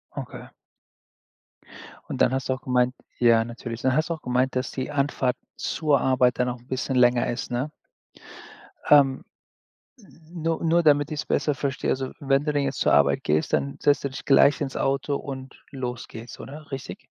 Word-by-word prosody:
Okay. - - -7 1.6
Und - - -4
dann 130 - +4
hast 135 0 -2
du - - +3
auch 130 - -7
gemeint 125 -1 +1 0.3
ja 115 -2 +5
natürlich. 115 0 -7
Dann 130 0 +2
hast 155 +2 +1
du - - 0
auch 160 - -9
gemeint, 125 +1 0
dass 130 - -1
die 130 +2 -4
Anfahrt 140 -3 0 0.2
zur 150 -3 +1
Arbeit 125 -1 +2
dann 125 - +2
noch 125 0 -4
'n 120 - -23
bisschen 130 0 -2
länger 125 -1 +4
ist, 120 +1 -4
ne? 130 +5 -2 1.2
Ähm 140 +1 +5 1.1
Nur 165 -1 -2
nur 170 +1 +3
damit 145 0 +3
ich's 150 - -3
besser 145 +1 +1
verstehe, 140 0 -2
also, 130 0 -2
wenn 135 +1 +1
du 150 - 0
denn 145 -1 +1
jetzt 135 -2 -3
zur - - +3
Arbeit - - +4
gehst, 75 +1 0
dann 70 0 0
setzt 145 - +3
du - - 0
dich 130 - -8
gleich 140 +1 +5
ins 135 -2 -3
Auto 140 +1 0
und 130 -1 -8
los 125 -3 -5
geht's, 115 +2 -10
oder? 150 +2 -10
Richtig? 135 -2 -6
130 Hz, 185 wpm, -25 LUFS, 125-145 Hz, 1.6 s, ja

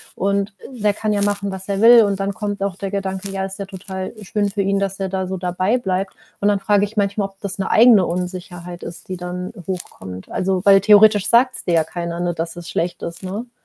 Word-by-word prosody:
und 200 +1 0 0.2
der 210 -5 0
kann 215 +1 -2
ja 205 -1 +1
machen, 200 -1 0
was 190 0 -7
er 200 0 -1
will 235 0 +8
und 200 -1 -1
dann 200 +1 -1
kommt 205 0 -4
auch 200 -3 -2
der 195 -1 -4
Gedanke: 195 -1 -3
„Ja, 195 0 -2
ist 195 +1 -8
ja 200 - -3
total 190 -1 -6
schön 205 +1 -1
für 200 0 -2
ihn, 195 0 +1
dass 195 -1 -2
er 190 - -1
da 190 0 -2
so 190 - -3
dabei 185 +5 0
bleibt.“ 190 -2 -2 0.3
Und 205 - +1
dann 205 -1 +2
frage 205 -1 +3
ich 210 +2 -11
manchmal, 200 -1 0
ob 195 0 -25
das 200 0 -4
'ne 190 - -1
eigene 225 -4 +6
Unsicherheit 180 0 -5
ist, 170 +2 -8
die 185 - -4
dann 180 +1 -5 0.2
hochkommt. 95 - -6
Also, 190 0 0
weil 195 -1 +7
theoretisch 210 0 +6
sagt's 250 +2 +3
dir 175 - +1
ja 160 - +4
keiner, 170 +1 -5
ne, 175 -1 0
dass 165 0 -4
es 175 -1 -9
schlecht 175 +1 -2
ist, 170 - -6
ne? 205 +6 -5
195 Hz, 240 wpm, -20 LUFS, 180-205 Hz, 0.3 s, will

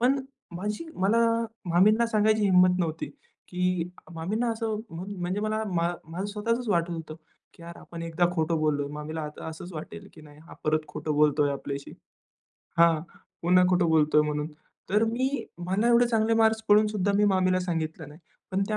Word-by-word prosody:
पण 260 +3 +3 0.4
माझी 210 - -4
मला 200 +5 +2 0.5
मामींना 215 +7 +4
सांगायची 215 -1 +2
हिम्मत 185 -2 +5
नव्हती, 160 -2 -2 0.4
की 180 -1 0 0.3
मामींना 215 +9 -1
असं 225 -1 -2
म्हणजे 180 +2 -4
मला 215 +1 -1
मा 170 0 +2 0.2
माझं 170 +4 -5
स्वतःचच 230 +3 -1
वाटत 170 -3 +1
होतं, 160 -2 -6 0.4
की - - -16
यार 170 0 -9
आपण 170 -1 -9
एकदा 165 +1 +1
खोटं 160 -1 0
बोललोय. 145 -2 0
मामीला 150 +2 -5
आता 150 0 -7
असंच 160 +3 -8
वाटेल, 195 +6 -8
की 160 - -13
नाही 150 -1 -15
हा - - -12
परत 155 0 +2
खोटं 155 - -4
बोलतोय 150 -1 +3
आपल्याशी 140 0 -6 0.9
हां, 165 -2 +5 0.4
पुन्हा 180 +2 +5
खोटं 180 -2 +3
बोलतोय 150 -1 +4
म्हणून. 150 0 -2 0.4
तर 210 +3 +3
मी 240 +4 0 0.4
मला 205 +6 +1
एवढे 240 0 +5
चांगले 225 -1 +2
मार्क्स 220 0 +3
पडून 210 +1 +6
सुद्धा 200 -1 0
मी 210 - +4
मामीला 185 0 +2
सांगितलं 160 -3 -3
नाही. 150 +3 -14 0.3
पण 190 +1 0
त्या 215 - 0
180 Hz, 170 wpm, -27 LUFS, 160-215 Hz, 0.9 s, पडून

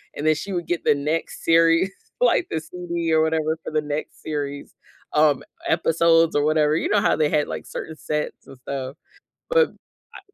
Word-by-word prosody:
and 145 - -4
then 155 - +5
she 200 +6 -6
would 175 -2 -2
get 175 - -2
the - - +4
next 150 +3 -3
series, 165 +3 +4 0.3
like 360 -7 +3
the 160 - -1
CD 170 0 -3
or 160 - +4
whatever 160 0 0
for - - -6
the 155 0 +1
next 150 +1 -5
series, 145 -2 -4 0.4
um, 150 -2 +3 0.2
episodes 165 0 +3
or 145 - +3
whatever. 155 0 +3
You - - -1
know 205 - +3
how - - +3
they 155 -1 +2
had 150 -1 +1
like - - -6
certain 160 - -6
sets 150 0 -4
and 135 - -12
stuff, 135 +1 -5 0.5
but 485 -1 +4 0.5
I - - -8
160 Hz, 190 wpm, -23 LUFS, 150-165 Hz, 0.5 s, then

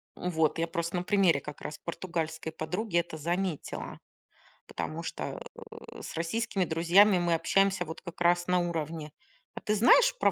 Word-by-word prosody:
Вот. 160 -3 0
Я 165 - +1
просто 170 +1 -3
на 175 - -1
примере 190 -7 +3
как 150 0 -9
раз 150 - -6
португальской 165 -2 -4
подруги 175 +5 -2
это 170 -2 -1
заметила, 175 +1 -3 0.7
потому 165 +2 -5
что, 335 - -5 0.2
э, - - -11
с - - -7
российскими 190 +4 -1
друзьями 175 +5 +5
мы 175 -1 +1
общаемся 195 +4 +2
вот 160 - -8
как 170 -2 -10
раз 175 0 +3
на 180 0 +3
уровне: 160 -2 -3 0.4
"А - - -6
ты 210 -2 0
знаешь 460 - +6
про - - +4
170 Hz, 165 wpm, -29 LUFS, 160-190 Hz, 0.7 s, знаешь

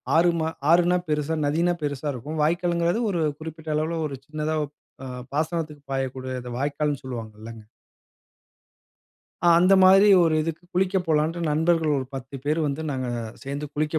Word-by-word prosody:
ஆறு 170 +1 +5
மா 160 - 0 0.2
ஆறுன்னா 175 +1 +4
பெருசா 150 +1 0
நதின்னா 170 +4 +1
பெருசா 145 0 -3
இருக்கும். 150 +6 -6
வாய்க்கால்ங்குறது, 170 +5 +1
ஒரு 170 -3 -1 0.2
குறிப்பிட்ட 160 0 -7
அளவுல, 160 +2 -1
ஒரு 135 -2 -7
சின்னதா 155 +1 -2 0.5
அ - - -6 0.3
பாசனத்துக்கு 155 -1 -2
பாயக்கூடிய 130 -1 -3
இத 125 - -7
வாய்க்கால்ன்னு 145 0 -1
சொல்லுவாங்க 115 -4 -6
இல்லங்க? 115 -1 -9 1.8
அ - - +7
அந்த 185 +3 +5
மாதிரி 195 +2 +7 0.2
ஒரு 165 -2 +3
இதுக்கு 165 +2 -4
குளிக்க 190 +1 +1
போலாண்ட்டு, 160 +2 +1
நண்பர்கள் 160 -1 +2
ஒரு 130 - -4
10 135 +1 -7
பேரு 155 +2 +1
வந்து 140 +3 -3
நாங்க 130 -1 -3 0.4
சேந்து 140 +2 -4
குளிக்க 155 +1 0
155 Hz, 150 wpm, -25 LUFS, 140-170 Hz, 1.8 s, அ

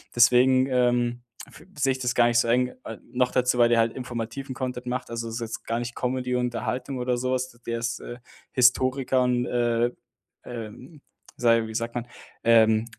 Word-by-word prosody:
deswegen, 130 +2 +5
ähm, 120 -1 +1 0.2
f - - -16
sehe 135 -2 +2
ich 130 - -7
das 125 -1 -1
gar 120 -1 +5
nicht 120 - +3
so 120 - +1
eng. 125 +2 +2
Äh, 115 - -6
noch 125 0 +1
dazu, 125 -1 +2
weil 120 -1 +6
der 120 -1 +3
halt 115 0 +2
informativen 125 +1 -5
Content 125 -1 -4
macht, 125 +1 -3
also, 115 0 -4
das 115 - -6
ist 120 - -4
jetzt 115 -1 -6
gar 115 +1 -1
nicht 120 0 -5
Comedy, 125 0 -2
Unterhaltung 125 +2 -3
oder 125 0 0
so 130 +1 -1
was. 130 0 -2 0.2
Der 115 0 -2
ist, 115 0 -3
äh, 120 - -9 0.3
Historiker 130 +1 +3
und, 125 0 +1
äh 120 0 +1 0.5
ähm, 120 +6 -9 0.4
sage 115 -2 +3
wie 110 - -8
sagt 115 +1 -3
man, 120 0 -3 0.4
ähm, 110 -1 +5
120 Hz, 195 wpm, -25 LUFS, 115-125 Hz, 0.5 s, weil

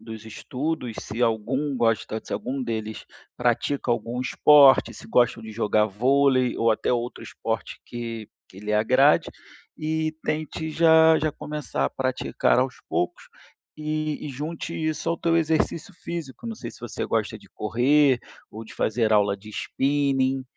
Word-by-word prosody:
dos 110 -1 -9
estudos, 125 +2 -4
se 115 +3 -4
algum 125 +5 0
gosta 115 -2 0
se - - -8
algum 130 +1 -3
deles 110 -2 -4 0.3
pratica 120 +2 0
algum 120 +1 -1
esporte, 140 +1 +6
se - - -11
gostam 120 -2 +2
de 110 0 -8
jogar 105 -1 +2
vôlei, 130 +4 +2
ou 115 0 +2
até 110 - 0
outro 120 0 -3
esporte - - -4
que 115 -2 -6 0.2
que 95 - -14
lhe 105 +1 -3
agrade, 130 +7 +4 0.5
e 155 0 -2
tente 155 +1 -3
já 160 0 +6
já 155 0 0
começar 150 0 -4
a - - 0
praticar 130 -1 0
aos 125 0 0
poucos, 90 - -2 0.5
e 155 0 -3
e - - -5
junte 150 +5 -5
isso 155 -1 -2
ao 170 - 0
teu 165 0 +2
exercício 160 +2 0
físico. 170 - -7
Não 230 - -4
sei - - -7
se - - -16
você - - -4
gosta - - -1
de - - -19
correr 130 +5 +3 0.3
ou 110 +1 -8
de - - -13
fazer 110 0 +1
aula 100 -1 +3
de 105 +2 -13
spinning, 135 +2 0
130 Hz, 160 wpm, -25 LUFS, 115-150 Hz, 0.5 s, esporte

